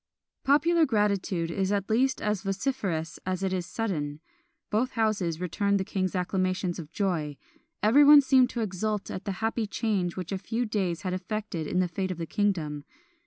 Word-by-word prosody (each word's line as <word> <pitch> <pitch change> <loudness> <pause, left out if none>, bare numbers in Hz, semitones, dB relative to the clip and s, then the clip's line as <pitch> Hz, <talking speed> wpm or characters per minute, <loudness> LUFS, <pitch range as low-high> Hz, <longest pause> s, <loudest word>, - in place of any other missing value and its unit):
Popular 320 +5 +4
gratitude 200 -6 0
is 190 +2 -1
at 200 -2 0
least 255 +4 +1
as 210 -2 0
vociferous 195 -5 -2
as 185 0 -2
it 190 -1 0
is 180 -2 -2
sudden. 155 -10 -3 0.5
Both 230 +5 +1
houses 200 -8 0
returned 200 +3 0
the - - 0
king 190 -1 -1
acclamations 185 0 -1
of 155 -2 -8
joy; 165 -8 -1 0.5
everyone 285 +6 +8
seemed 260 -2 +4
to 240 - -3
exult 210 0 -2
at 185 - -6
the 200 - -1
happy 225 0 0
change 200 -5 -1
which 180 -1 -5
a 195 - -2
few 230 +4 -2
days 195 -5 -2
had 185 -1 -2
effected 185 -3 -4
in 180 - +1
the 180 - +1
fate 185 +2 -3
of 185 - -4
the 165 - -3
kingdom. 165 -7 -1
195 Hz, 175 wpm, -28 LUFS, 180-220 Hz, 0.5 s, everyone